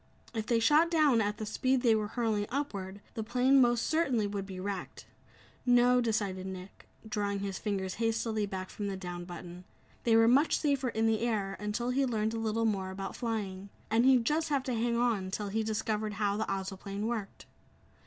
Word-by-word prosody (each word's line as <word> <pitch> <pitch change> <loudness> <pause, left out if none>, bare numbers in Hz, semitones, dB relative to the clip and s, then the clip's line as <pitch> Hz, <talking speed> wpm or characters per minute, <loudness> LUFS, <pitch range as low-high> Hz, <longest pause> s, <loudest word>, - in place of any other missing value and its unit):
If 220 -2 -3
they 235 -2 +3
shot 300 +8 +4
down 300 -8 +4
at 205 0 -1
the 215 - -4
speed 255 +4 0
they 235 -3 +5
were 215 -1 0
hurling 215 -2 -1
upward, 200 -8 -4
the 225 - -3
plane 250 +4 +4
most 240 -1 +3
certainly 270 -9 +1
would 200 -1 -4
be 190 -2 -7
wrecked. 195 -1 -5 0.6
No, 245 0 +5
decided 200 -5 -1
Nick, 185 0 -9 0.2
drawing 205 -3 -2
his 195 -1 -3
fingers 190 -3 -2
hastily 225 -2 0
back 190 -1 -5
from 205 - -4
the 195 -1 -3
"down" 175 -2 -6
button 175 0 -9 0.4
they 230 -1 +4
were 225 0 +6
much 275 +6 +4
safer 280 -4 0
in 225 -1 0
the 225 -1 +2
air 215 -5 -1
until 220 +4 -2
he 275 +2 +2
learned 220 -3 0
a - - -2
little 225 0 0
more 195 -4 0
about 195 +1 -5
flying, 200 -5 -3 0.2
and 225 +2 +4
he'd 255 -2 +5
just 315 +4 +1
have 280 -3 +1
to 255 - -2
hang 235 +1 0
on 225 -6 +1
till 205 +1 -3
he 220 +3 0
discovered 215 0 -2
how 205 -1 0
the 220 +1 -2
Ozoplane 195 +1 -4
worked. 220 -4 -4
220 Hz, 195 wpm, -31 LUFS, 200-240 Hz, 0.6 s, were